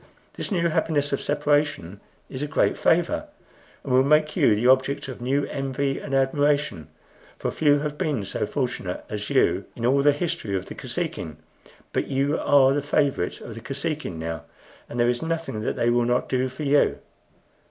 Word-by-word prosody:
This - - -5
new 170 -3 +2
happiness 155 -3 0
of 140 - 0
separation 145 - 0 0.3
is 130 - -7
a 150 - -1
great 155 - +2
favor, 175 - +1 0.6
and 130 - -2
will 130 +1 +6
make 150 +2 +3
you 105 - +4
the 110 +4 -1
object 130 +2 +3
of 130 -2 -8
new 135 +3 +1
envy 135 0 -2
and 135 - -3
admiration; 140 - +1 0.5
for - - -2
few 145 -2 +3
have 150 0 -4
been 135 -10 -1
so 100 - -2
fortunate 125 -10 -3
as 105 -1 -4
you - - +2
in 115 - -3
all 135 +3 +4
the 145 +1 +5
history 145 - -2
of 95 0 -2
the - - -8
Kosekin. 75 -2 -4 0.6
But - - 0
you 140 +2 0
are 135 -2 +5
the 145 - 0
favorite 145 - 0
of 115 - -8
the 115 - -9
Kosekin 145 - -4
now, 80 -1 -5 0.4
and 120 - -5
there 120 - +4
is 120 0 +1
nothing 160 -8 -3
that - - -2
they 120 - +2
will 120 0 +2
not 120 +1 +1
do 130 0 0
for 130 +4 -7
you." 145 0 +3
135 Hz, 185 wpm, -24 LUFS, 120-150 Hz, 0.6 s, will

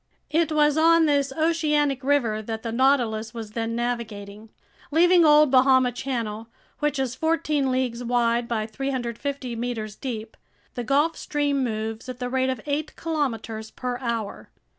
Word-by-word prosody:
It 320 0 +2
was 300 -1 +3
on 330 0 +5
this 285 -2 +2
oceanic 300 -3 +1
river 250 -6 +1
that 220 0 -5
the 230 - -3
Nautilus 235 -3 +1
was 220 -2 -6
then 230 +1 -3
navigating. 220 -3 -4 0.4
Leaving 350 +3 +5
Old 300 -2 +6
Bahama 260 -1 +5
Channel, 230 -4 -4 0.3
which 295 -1 0
is 265 -3 -1
fourteen 300 -1 0
leagues 250 -2 -1
wide 235 0 +1
by 220 -2 -1
350 255 +1 -4
meters 225 -3 -4
deep, 220 -4 -6 0.4
the 245 - -4
Gulf 290 +7 +2
Stream 285 -2 -1
moves 220 +1 -4
at 250 - -6
the 250 -1 -4
rate 260 0 +1
of 260 - -2
eight 295 +1 -2
kilometers 230 -9 -3
per 250 +1 -4
hour. 230 -5 -4
255 Hz, 150 wpm, -24 LUFS, 230-290 Hz, 0.4 s, Old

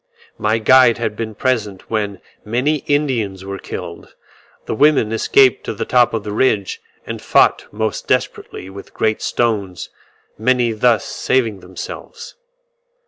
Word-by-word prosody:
My 110 +1 +1
guide 120 +1 +5
had 110 -2 -2
been 110 -1 -5
present 110 -8 -2
when 105 -3 -2 0.2
many 125 +8 0
Indians 120 -10 0
were 100 0 -5
killed: - - -8 0.5
the - - -3
women 140 -3 +3
escaped 130 +3 +3
to - - -4
the - - -3
top 125 -2 +3
of 110 - -3
the 105 - -5
ridge, 105 -3 0 0.2
and - - -6
fought - - +3
most 110 0 -3
desperately 95 - -2
with 100 +1 -11
great 110 -1 0
stones; 100 -6 -1 0.5
many 120 0 +2
thus 115 +1 +2
saving 115 -6 0
themselves. 95 - -9
110 Hz, 140 wpm, -18 LUFS, 105-125 Hz, 0.5 s, guide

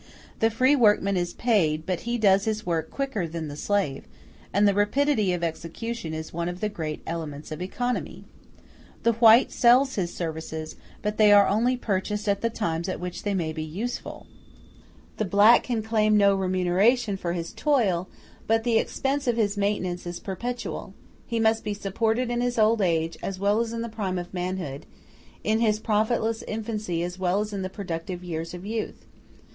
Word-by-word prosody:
The 225 - +4
free 255 +5 +3
workman 210 -5 +3
is 175 -1 -2
paid, 165 -10 +1
but 185 -3 -1
he 240 - 0
does 200 -3 +4
his 215 0 -2
work 165 -2 -1
quicker 270 -11 -2
than 160 -1 -5
the 145 - -7
slave, 170 -5 -1 0.4
and 205 +1 +4
rapidity 215 0 +2
of 175 -1 -2
execution 170 +4 -4
is 160 0 -6
one 170 +1 -2
of 175 0 -6
the 215 - -1
great 155 -6 -5
elements 155 -3 -5
of 155 - -5
economy. 245 +7 -3 0.8
The 235 - +4
white 230 +2 +6
sells 255 +3 +4
his 175 -4 -2
services, 160 -1 -5 0.3
but 210 0 -2
they 210 -1 +6
are 205 -1 +7
only 240 +5 +2
purchased 210 -1 -2
at 200 -1 +1
the 230 - +1
times 170 -6 -2
at 185 - -3
which 180 0 -5
they 205 -1 -1
may 160 -4 -1
be 155 - -4
useful; 190 +11 -5 0.9
the - - 0
black 205 +4 +6
can 235 -3 -2
claim 215 -1 +3
no 200 -1 +5
remuneration 195 +5 +2
for 175 -3 -3
his 170 -1 -4
toil, 200 - +1 0.4
but 225 0 +2
the 230 -2 +3
expense 275 0 -2
of 240 -1 +2
his 205 -3 +1
maintenance 195 -4 -1
is 175 - -5
perpetual; 240 +5 -5 0.3
he 230 -1 -1
must 225 0 +2
be 210 -1 -2
supported 225 +5 -1
in 240 0 0
his 245 0 -1
old 220 0 +4
age 165 -3 0
as 195 - -4
well 200 +3 +2
as 230 -1 -1
in 230 0 -3
the - - -3
prime 205 -5 -3
of 175 +1 -6
manhood, 180 -6 -4 0.6
in 220 +1 +1
his 215 -2 +2
profitless 220 +1 0
infancy 215 -6 -3
as 180 +1 -5
well 185 +1 +1
as 210 0 -3
in 200 - -3
the 185 - -3
productive 180 -2 -5
years 165 -1 -5
of 180 +2 -9
youth. 220 +1 -4
205 Hz, 185 wpm, -26 LUFS, 175-225 Hz, 0.9 s, are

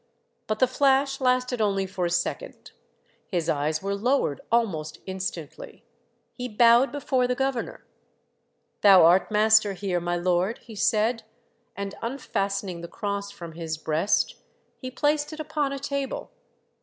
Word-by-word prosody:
But 215 - -1
the 255 - +5
flash 270 +1 +2
lasted 250 -1 +1
only 195 -2 +1
for 185 -2 -2
a - - -3
second. 175 0 -3 0.6
His 175 -4 -2
eyes 155 +3 0
were 200 0 -1
lowered 215 - 0
almost 165 -10 0
instantly; 185 -5 -6 0.5
he 250 -1 -5
bowed 235 +4 +5
before 265 -3 0
the 250 - 0
governor. 265 -2 -3 0.5
" - - -48
Thou 190 -5 +8
art 175 +3 +4
master 215 -1 +4
here, 185 -2 -2
my 175 0 -2
Lord," 180 +5 0
he 230 - -14
said, 220 +3 +1 0.5
and 200 0 -5
unfastening 200 -7 -3
the 170 - -7
cross 200 +1 -4
from 175 -5 -9
his 160 -1 -5
breast, 160 +6 0 0.4
he 255 - -6
placed 295 +3 0
it 310 - -9
upon 300 -2 -2
a 275 - -3
table. 280 0 -4
210 Hz, 145 wpm, -25 LUFS, 180-255 Hz, 0.6 s, Thou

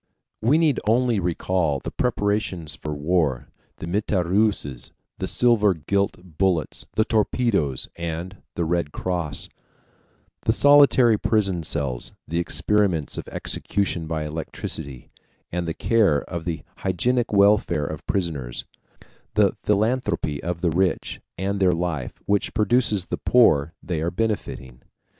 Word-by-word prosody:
We 130 +8 +4
need 155 -5 +3
only 120 -1 +3
recall 90 -3 0
the - - -6
preparations 100 - -1
for 75 0 -6
war, 75 -4 0 0.3
the - - -6
mitrailleuses, 95 - 0 0.3
the - - -2
silver 110 -6 +3
gilt 90 0 -2
bullets, 90 -5 0
the 110 - +3
torpedoes, 105 - +1
and 85 +3 -5 0.2
the 85 - 0
Red 85 -2 0
Cross; 85 -5 -2 1.0
the 110 - +3
solitary 135 -5 +6
prison 105 -5 +1
cells, 70 -6 -3
the 85 +2 -1
experiments 85 -3 +1
of - - -8
execution 95 -5 -2
by 80 -1 -2
electricity 75 -4 -5 0.4
and 90 0 -2
the 80 - -3
care 105 -11 +2
of 85 -2 -6
the 85 -2 -3
hygienic 120 +7 0
welfare 100 -6 +3
of 80 +1 -6
prisoners; 75 -11 -2 0.7
the - - +3
philanthropy 105 - 0
of 85 0 -3
the 85 - +2
rich, 90 +3 0 0.2
and 100 +2 -1
their 95 -2 +4
life, 85 -6 -3
which 100 +2 0
produces 110 -3 +2
the - - -3
poor 80 - +4
they 85 -4 -2
are 85 - 0
benefiting. 90 - -3
90 Hz, 130 wpm, -24 LUFS, 80-105 Hz, 1.0 s, solitary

